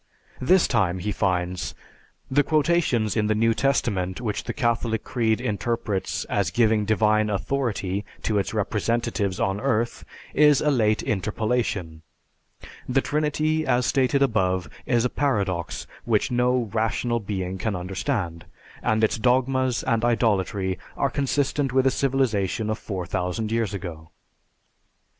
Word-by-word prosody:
This 180 Hz, +8 st, +4 dB
time 95 Hz, -7 st, +1 dB
he 105 Hz, +3 st, -2 dB
finds: 90 Hz, -3 st, -1 dB, 0.6 s
The 145 Hz, +2 st, +5 dB
quotations 150 Hz, -, +1 dB
in 105 Hz, -2 st, +1 dB
the 110 Hz, -, +2 dB
New 115 Hz, +1 st, +3 dB
Testament 105 Hz, -8 st, 0 dB
which 110 Hz, -4 st, -3 dB
the -, -, -2 dB
Catholic 115 Hz, -2 st, 0 dB
creed 115 Hz, -3 st, 0 dB
interprets 105 Hz, -3 st, -2 dB
as 100 Hz, -4 st, 0 dB
giving 110 Hz, +1 st, +2 dB
divine 110 Hz, 0 st, +2 dB
authority 105 Hz, -3 st, -1 dB, 0.2 s
to 105 Hz, -2 st, +1 dB
its 95 Hz, -, -2 dB
representatives 105 Hz, -2 st, -1 dB
on 95 Hz, +1 st, 0 dB
earth 120 Hz, -3 st, 0 dB, 0.3 s
is 150 Hz, -1 st, +5 dB
a 150 Hz, -, +2 dB
late 110 Hz, -5 st, +2 dB
interpolation; 110 Hz, -6 st, -1 dB, 0.9 s
the 135 Hz, +1 st, +3 dB
Trinity 155 Hz, +2 st, 0 dB
as 125 Hz, -2 st, +1 dB
stated 135 Hz, +1 st, +2 dB
above 95 Hz, -7 st, +1 dB, 0.2 s
is 120 Hz, -1 st, +2 dB
a -, -, +4 dB
paradox 100 Hz, -12 st, -1 dB, 0.2 s
which -, -, +1 dB
no 125 Hz, 0 st, +2 dB
rational 115 Hz, +1 st, 0 dB
being 95 Hz, -3 st, -4 dB
can 110 Hz, 0 st, -1 dB
understand, 90 Hz, -, -3 dB, 0.3 s
and 110 Hz, 0 st, +1 dB
its 110 Hz, -, +2 dB
dogmas 130 Hz, +1 st, +2 dB
and 115 Hz, 0 st, +1 dB
idolatry 100 Hz, -6 st, +1 dB, 0.2 s
are -, -, +1 dB
consistent 140 Hz, -1 st, 0 dB
with 130 Hz, 0 st, +3 dB
a 135 Hz, -, +4 dB
civilization 115 Hz, -6 st, 0 dB
of 110 Hz, -, -3 dB
4000 90 Hz, +2 st, -3 dB
years 115 Hz, -2 st, 0 dB
ago. 80 Hz, -5 st, -7 dB
110 Hz, 135 wpm, -24 LUFS, 100-125 Hz, 0.9 s, The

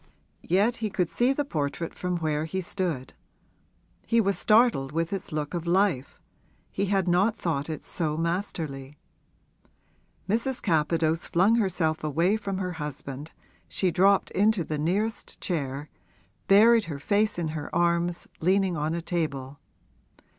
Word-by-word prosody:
Yet 205 Hz, +7 st, +3 dB
he 220 Hz, -2 st, -2 dB
could 180 Hz, -4 st, -1 dB
see 245 Hz, +2 st, +2 dB
the 285 Hz, +1 st, -1 dB
portrait 155 Hz, -, -3 dB
from 180 Hz, -1 st, -2 dB
where 155 Hz, -2 st, -1 dB
he 190 Hz, +4 st, -3 dB
stood; 175 Hz, -7 st, -3 dB, 0.9 s
he 230 Hz, -, +3 dB
was 200 Hz, -3 st, +2 dB
startled 215 Hz, -, +3 dB
with 165 Hz, +4 st, -1 dB
its 195 Hz, -, -4 dB
look 150 Hz, 0 st, -3 dB
of 170 Hz, -1 st, -3 dB
life 175 Hz, -7 st, +1 dB, 0.5 s
he 200 Hz, -, -1 dB
had 195 Hz, -2 st, +1 dB
not 190 Hz, +6 st, +2 dB
thought 160 Hz, -3 st, -2 dB
it 155 Hz, -2 st, -5 dB
so 155 Hz, -3 st, -2 dB
masterly. 160 Hz, -5 st, -3 dB, 1.3 s
Mrs. 235 Hz, +5 st, 0 dB
Capadose 160 Hz, -1 st, +1 dB
flung 195 Hz, +7 st, +3 dB
herself 175 Hz, -7 st, 0 dB
away 165 Hz, +7 st, +2 dB
from 200 Hz, -3 st, -3 dB
her 185 Hz, -1 st, -2 dB
husband 145 Hz, 0 st, -6 dB, 0.4 s
she 185 Hz, -2 st, 0 dB
dropped 195 Hz, +3 st, +3 dB
into 205 Hz, -1 st, +2 dB
the 155 Hz, -1 st, -3 dB
nearest 200 Hz, +8 st, -2 dB
chair, 145 Hz, -4 st, -3 dB, 0.6 s
buried 225 Hz, +3 st, +6 dB
her 155 Hz, -4 st, -5 dB
face 205 Hz, +8 st, +1 dB
in 165 Hz, -2 st, -1 dB
her 155 Hz, -2 st, -5 dB
arms, 170 Hz, 0 st, +1 dB
leaning 190 Hz, +1 st, +2 dB
on 155 Hz, +1 st, -1 dB
a 170 Hz, -, -4 dB
table. 145 Hz, -6 st, -3 dB
175 Hz, 145 wpm, -27 LUFS, 155-200 Hz, 1.3 s, buried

